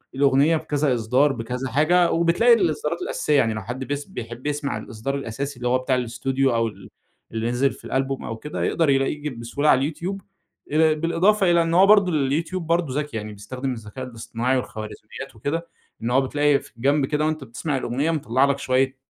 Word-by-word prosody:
الأغنية 140 +4 +4
بكذا 145 -3 0
إصدار، 125 +5 +2
بكذا 125 +2 -4
حاجة، 170 +6 +3
وبتلاقي 170 +9 +4
الإصدارات 170 -4 0
الأساسية. 150 -4 0
يعني 115 -4 +2
لو 105 - -4
حد 125 +5 -5
بيس 145 0 -3
بيحب 120 - -7
يسمع 145 -5 -2
الإصدار 110 +5 -4
الأساسي، 140 +1 -4
اللي 125 0 -3
هو 125 +1 +3
بتاع 130 +1 0
الأستوديو 130 +1 0
أو 115 0 +2
ال 110 - -10 0.4
اللي 115 +1 -2
نزل 135 +3 +2
في - - -14
الألبوم 135 0 -2
أو 110 - -5
كده، 150 +5 -5
يقدَر 165 -3 +1
يلاقيه 135 +2 +1
ج - - -2
بسهولة 125 +4 -1
على 135 +4 +3
الYouTube. 185 +6 -4 0.5
آآ، 155 +1 +4
بالإضافة 175 +5 +2
إلى 170 -1 +4
إن 165 0 -1
هو 185 +3 +7
برضه 200 -4 +6 0.2
الYouTube 165 +6 -1
برضه 165 -5 0
ذكي 150 -5 -4
يعني 105 0 -6
بيستخدم 125 +6 -5
الذكاء 115 +3 -7
الاصطناعي 120 +1 -2
والخوارزميات 110 +2 -7
وكده، 160 +9 -3 0.4
إن 120 - -1
هو 135 +2 +4
بتلاقي 145 +1 +2
في - - -18
الجنب 140 +4 +2
كده 150 +2 0
وأنت 155 -2 -1
بتسمَع 135 +4 -3
الأغنية 135 +6 -1
مطلع 130 -3 +2
لك 140 0 0
شوية 130 +1 +1
135 Hz, 190 wpm, -23 LUFS, 125-155 Hz, 0.5 s, هو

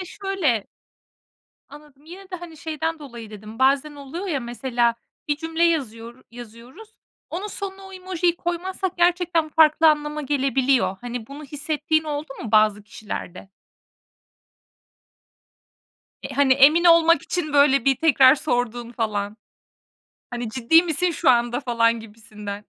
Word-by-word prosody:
de 370 - -5
şöyle 345 - -2 1.0
Anladım. 295 -1 -16
Yine 375 +4 -13
de, 365 - -4
hani, 340 -2 -11
şeyden 320 +1 -4
dolayı 235 -6 -10
dedim: 215 +1 -11
Bazen 275 +3 +2
oluyor 290 +7 -7
ya, 290 -7 -2
mesela, 240 -1 -1 0.3
bir 295 - +1
cümle 325 +2 -3
yazıyor 240 -6 -2
yazıyoruz; 240 - -13 0.4
onun 370 +5 -4
sonuna 390 -1 -7
o 385 - -13
emojiyi 365 -2 -1
koymazsak 360 +2 -4
gerçekten 345 -2 +1
farklı 315 +1 +4
anlama 300 0 -2
gelebiliyor. 265 -7 +1
Hani, 240 -2 -6
bunu 285 +2 -10
hissettiğin 305 +2 -2
oldu 300 0 -4
mu 225 - -7
bazı 215 -1 +3
kişilerde? 195 -2 -8 2.7
E, - - -7
hani, 280 -2 +4
emin 300 +6 +5
olmak 335 -2 +5
için, 325 -5 -3
böyle, 280 -3 +4
bir 270 -1 +3
tekrar 275 -3 +5
sorduğun 245 -3 -3
falan. 210 -3 -3 0.9
Hani, 240 -2 -4
"Ciddi 265 +8 +4
misin 350 +1 0
şu 320 -3 +2
anda?" 240 +1 +1
falan 230 -3 +1
gibisinden. 210 -2 -10
280 Hz, 130 wpm, -22 LUFS, 235-330 Hz, 2.7 s, emin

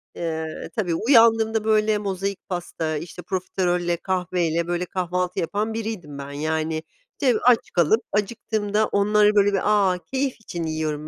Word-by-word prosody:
Eee 160 -2 -4
Tabii, 180 -7 0
uyandığımda, 225 -1 +4
böyle, 215 -1 +3
mozaik 195 -1 -4
pasta, 165 -3 -3
işte, 170 +3 -8
profiterolle, 175 -1 -1
kahveyle, 175 -2 -1
böyle, 175 +1 -1
kahvaltı 180 0 -2
yapan 210 +6 -1
biriydim 215 -10 -5
ben 140 0 -7
yani. 155 +2 -2 0.4
Te 255 -6 +3
aç 245 -2 +4
kalıp 175 +7 +3
acıktığımda 210 0 0
onları, 210 +1 +3
böyle, 205 0 +4
bir, 195 - +2 0.3
"A, 180 - -3
keyif 270 0 0
için 175 -6 -5
yiyorum 155 -1 -3
185 Hz, 140 wpm, -23 LUFS, 165-215 Hz, 0.4 s, uyandığımda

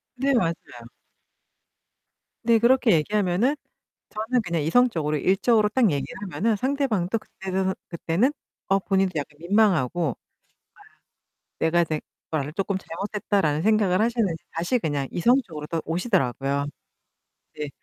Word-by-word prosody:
네. 275 +2 +1
맞아요. 185 -10 +3 1.9
네. 230 0 +4
그렇게 245 0 +4
얘기하면은 200 - +2 0.6
저는 225 +3 -1
그냥 170 -5 -2
이성적으로 160 -5 +2
일적으로 210 - +3
딱 225 -1 +3
얘기를 140 -3 -3
하면은 205 +4 0
상대방도 230 -6 0
그때는 190 -2 -3
그때는 175 - 0 0.4
어 195 0 +4
본인도 195 -1 +1
약간 150 -1 -4
민망하고. 175 - +2 1.4
네. - - +1
내가 170 +1 +3
되 155 -2 -3 0.3
걸 150 -1 -2
조금 195 +2 -1
잘못했다라는 195 -4 -1
생각을 210 -1 +3
하셨는지 225 -8 0
다시 175 +10 0
그냥 145 -7 -2
이성적으로 175 - +1
또 165 -1 -2
오시더라고요. 140 - 0 0.9
네. 150 -1 -4
190 Hz, 305 characters per minute, -24 LUFS, 160-220 Hz, 1.9 s, 네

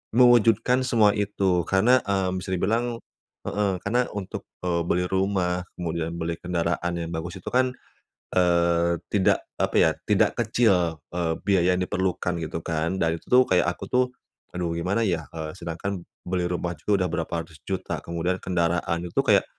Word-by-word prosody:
mewujudkan 120 0 +5
semua 110 -4 +5
itu. 95 -4 0
Karena, 115 +7 +4
mmm, 95 -2 0
bisa 95 - -7
dibilang 115 +5 0 0.5
heeh, 105 -1 0
karena 120 +4 +1
untuk, 100 -2 -6 0.2
eee, 85 -1 +1
beli 90 +1 +1
rumah, 95 -2 0
kemudian 85 -1 -3
beli 85 0 -2
kendaraan 85 0 -1
yang 85 -1 -3
bagus 85 +3 -5
itu - - -19
kan, 130 +1 +3 0.6
eee, 85 -1 +3
tidak, 100 -2 +2
apa - - 0
ya, - - +6 0.2
tidak - - +3
kecil, 95 - +2
eee, 85 -2 0
biaya 90 -2 +3
yang 90 - -1
diperlukan 90 -1 -1
gitu 80 +1 -4
kan. 80 +3 -1
Dan 80 0 +1
itu - - -26
tuh 125 +1 +7
kayak 90 -2 +4
aku 90 - -8
tuh, 125 0 +3 0.5
"Aduh, 85 -2 -2
gimana 95 +7 0
ya?" 85 -4 -1
Eee, 80 -1 -5
sedangkan 85 +2 -4 0.2
beli 90 -1 0
rumah 85 -1 -2
juga 100 +3 +1
udah 90 - -2
berapa 85 0 -3
ratus 80 -1 -17
juta, 95 -1 -2
kemudian 85 +2 -1
kendaraan 85 -1 0
itu - - -1
kayak - - +4
90 Hz, 165 wpm, -25 LUFS, 85-100 Hz, 0.6 s, tuh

